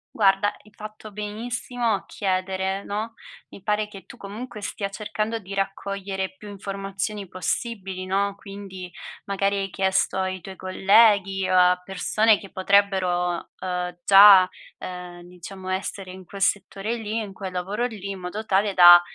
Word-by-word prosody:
Guarda, 195 -1 +4 0.2
hai 210 - -19
fatto 215 0 -10
benissimo 230 +3 -2
a 195 - -3
chiedere, 190 0 -2
no, 220 +3 -4 0.3
mi - - -12
pare 210 +1 0
che 195 -2 -12
tu - - -12
comunque 215 +3 -8
stia 200 0 -3
cercando 215 +2 -3
di 195 -1 -9
raccogliere 195 -1 -3
più 210 - -11
informazioni 195 +1 -4
possibili, 190 +1 -3
no, 200 +2 0
quindi 195 -2 -9 0.4
magari 200 0 0
hai 195 0 -2
chiesto 190 0 +1
ai 190 0 -1
tuoi 190 +2 -9
colleghi 195 0 +3
o 185 - +4
a 180 0 +4
persone 205 +3 +2
che 195 - -11
potrebbero, 185 -3 +1
uhm, 180 -1 -3
già, 195 -2 +9 0.3
uhm 180 -1 -8
diciamo, 185 +2 -10
essere 190 0 -3
in 185 0 -10
quel 195 +2 -10
settore 205 +2 0
lì 220 -1 -4
in 210 -3 -4
quel 190 -1 -6
lavoro 195 +6 -2
lì, 210 -5 -5
in 195 - -6
modo 200 +5 -5
tale 200 0 +2
da, 175 -1 +10
195 Hz, 155 wpm, -24 LUFS, 185-210 Hz, 0.4 s, da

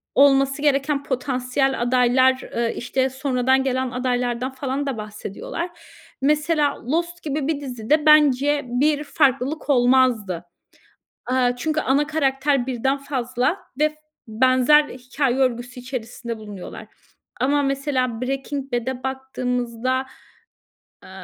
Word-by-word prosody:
olması 275 0 +4
gereken 280 0 +1
potansiyel 260 0 -1
adaylar, 255 +1 +3 0.2
ııı, 235 -1 +1
işte, 260 +2 -1
sonradan 260 0 +1
gelen 260 -1 -1
adaylardan 250 0 -1
falan 270 +1 -3
da 265 -5 -2
bahsediyorlar. 210 - -6 0.5
Mesela 300 0 +1
Lost 340 +6 -2
gibi 290 -1 -2
bir 295 -3 -1
dizide 265 +3 0
bence 290 -1 +5
bir 290 +4 +1
farklılık 275 +1 0
olmazdı. 245 -9 +3 0.8
Aaa, 250 -1 +2
çünkü 310 +4 -1
ana 280 +3 +1
karakter 275 -3 +1
birden 265 +2 0
fazla 260 +2 -1 0.2
ve 305 0 +4
f 305 - -19 0.3
benzer 255 +6 +4
hikâye 255 -1 -2
örgüsü 250 -1 -1
içerisinde 240 -2 -6
bulunuyorlar. 205 -4 -9 0.5
Ama 285 +3 +2
mesela 270 -4 -1
Breaking 270 0 -4
Bad'e 250 +1 -2
baktığımızda, 255 -1 -2 1.0
eee, - - -13
260 Hz, 115 wpm, -22 LUFS, 250-285 Hz, 1.0 s, bence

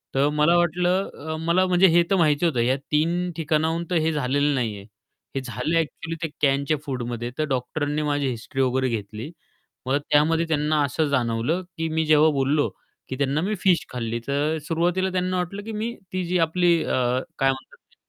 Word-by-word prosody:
तर 140 +2 +3
मला 150 +3 +4
वाटलं, 180 +3 +1 0.2
अ, - - -2
मला 185 +2 +3
म्हणजे 185 +1 +5
हे 170 +1 +5
तर 195 - +3
माहिती 155 -2 +3
होतं 140 -8 +1
या 125 +3 +2 0.2
3 170 +4 +1
ठिकाणाहून 160 +1 0
तर 180 - 0
हे 160 - +2
झालेलं 145 +1 +1
नाही 115 -5 -1
आहे, 100 - -11 0.5
हे 135 - -1
झालं 130 +6 -2
ॲक्चुअली 165 +1 -2
ते 160 - -1
कॅनच्या 140 +2 +2
फूडमध्ये. 120 -3 -4
तर 155 - +1
डॉक्टरांनी 145 +4 -1
माझी 145 -2 0
हिस्ट्री 125 +3 -3
वगैरे 130 0 +1
घेतली. 110 +5 -5 0.6
मग 135 - +2
त्यामध्ये 160 +3 +3
त्यांना 150 -1 +1
असं 150 +3 0
जाणवलं, 125 +5 0 0.2
की 165 0 -1
मी 160 0 0
जेव्हा 155 0 +5
बोललो, 140 +2 +1 0.4
की 130 - -3
त्यांना 140 +2 0
"मी 205 +5 -1
फिश 180 -3 +2
खाल्ली." 115 -2 -3
तर 145 +3 0
सुरुवातीला 175 +3 +1
त्यांना 185 0 -1
वाटलं 180 +3 -3
की 225 - -6
मी 220 +2 -3 0.2
ती 185 -1 -1
जी 180 +1 0
आपली 170 +1 +3
अ, - - -2 0.4
काय 135 0 +3
म्हणतात 130 0 -9 0.2
ते - - -28
155 Hz, 190 wpm, -24 LUFS, 135-170 Hz, 0.6 s, म्हणजे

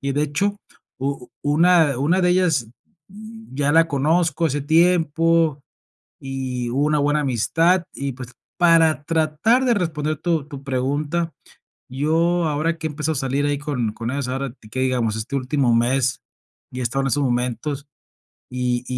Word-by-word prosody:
Y 140 0 -2
de 145 - 0
hecho, 195 +8 -1 0.4
u 135 -1 -4
una 155 -2 +3
una 170 +7 +2
de 180 - +3
ellas, 165 -10 +2 0.4
mm, 220 - -12
ya 145 +1 +1
la 165 +1 +5
conozco 165 +3 +1
hace 145 0 -1
tiempo, 165 -1 +2 0.6
y 130 -2 -4
hubo 140 +3 +1
una 150 0 +2
buena 145 +1 +1
amistad 165 - +2
y 140 0 -3
pues, 125 0 -10 0.2
para 165 -5 +4
tratar 165 - +2
de 240 - +4
responder 155 -5 -2
tu 160 -3 -1
tu 140 -2 -10
pregunta, 145 +5 -1 0.6
yo 165 +6 +1
ahora 155 +3 0
que 160 - -4
he - - -8
empezado 150 +1 -2
a - - -4
salir 135 +2 -1
ahí 145 0 0
con 130 -7 -2
con 115 +1 -5
ellos, 140 -1 -3
ahora 135 +1 -3
te 110 -5 -18
que 130 +4 -4
digamos 125 -4 0
este 110 +5 -4
último 130 -2 +1
mes 125 +2 +1 0.5
y 125 - -5
he - - -1
estado 130 +3 -1
en - - -1
estos 145 +3 0
momentos 125 +4 -2 0.6
y 125 -1 -1
145 Hz, 170 wpm, -21 LUFS, 130-165 Hz, 0.6 s, la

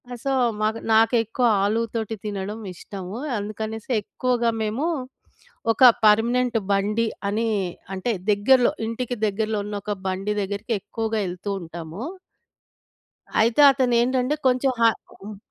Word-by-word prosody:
ఆ! - - -6
సో, 275 - 0 0.3
మాకు 215 +1 0
నాకెక్కువ 225 +2 +3 0.2
ఆలు 215 +3 +1
తోటి 225 -1 -2
తినడము 205 +2 -4
ఇష్టము. 190 +3 -8 0.2
అందుకనేసి 215 +3 -5
ఎక్కువగా 240 +2 0
మేము 220 +7 -1 0.9
ఒక 225 - +1 0.2
పర్మనెంట్ 235 +3 +3
బండి 210 +3 +1 0.2
అని, 225 +3 0 0.5
అంటే 190 +6 -1 0.2
దగ్గరలో 240 +5 +4 0.2
ఇంటికి 245 +2 -3
దగ్గరలో 215 +1 -1
ఉన్నొక 205 0 -4
బండి 195 +2 -1
దగ్గరికి 200 +4 -3
ఎక్కువగా 225 +2 -3
ఎళ్తూ 180 +3 -6
ఉంటాము. 165 +2 -8 1.4
అయితే 230 +5 +3
అతనేంటంటే 255 +1 +1
కొంచెం 255 +1 +2
హా 230 - +7 0.3
హ్మ్. 210 0 -8
220 Hz, 115 wpm, -23 LUFS, 205-240 Hz, 1.4 s, హా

